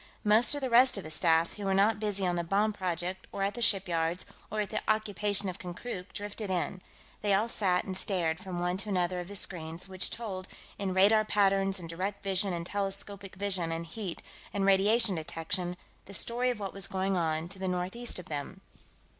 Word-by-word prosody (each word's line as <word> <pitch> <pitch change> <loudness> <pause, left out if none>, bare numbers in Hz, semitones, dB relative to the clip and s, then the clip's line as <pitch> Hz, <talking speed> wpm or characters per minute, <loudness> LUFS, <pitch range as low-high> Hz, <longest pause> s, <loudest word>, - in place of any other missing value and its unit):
Most 215 +6 +5
of 290 - -3
the 260 - -1
rest 250 0 +6
of 195 - -4
his 155 - -4
staff 165 0 +3
who 205 - -6
were 195 0 +2
not 205 +2 +4
busy 205 -3 -1
on 175 -1 +1
the 170 - -1
bomb 205 +5 +2
project 185 -1 -3
or 195 - -2
at 200 +1 0
the 240 - -6
shipyards 180 -5 +2 0.2
or 215 - -4
with 210 -2 -1
the - - -1
occupation 205 -2 +1
of 185 0 -4
Konkrook 180 +2 -6
drifted 205 0 -5
in; 185 0 -1 0.4
they 205 -2 +3
all 210 +4 +2
sat 185 -6 +1
and 190 - -4
stared 175 -4 +1
from 180 -2 -5
one 180 +1 0
to 210 +2 -4
another 180 -2 +1
of 175 - -5
the 205 - -7
screens, 165 -2 -2
which 190 -1 +1
told, 195 -5 -5 0.3
in 190 -2 -1
radar 210 +3 +6
patterns 195 -2 +2
and 175 -3 -7
direct 185 +5 -4
vision 195 0 +1
and 170 -1 -3
telescopic 200 0 -4
vision 190 -4 0
and 165 +1 -3
heat 185 +1 -5 0.3
and 200 -1 0
radiation 200 +3 +4
detection, 175 +2 -3 0.3
the 200 - -6
story 245 +5 +2
of 245 -3 -2
what 195 -2 -4
was 195 -2 +3
going 190 0 0
on 160 -2 0
to 190 0 -7
the 190 - -2
northeast 185 +7 -2
of 180 - -7
them. 155 +6 -5
195 Hz, 210 wpm, -30 LUFS, 180-205 Hz, 0.4 s, rest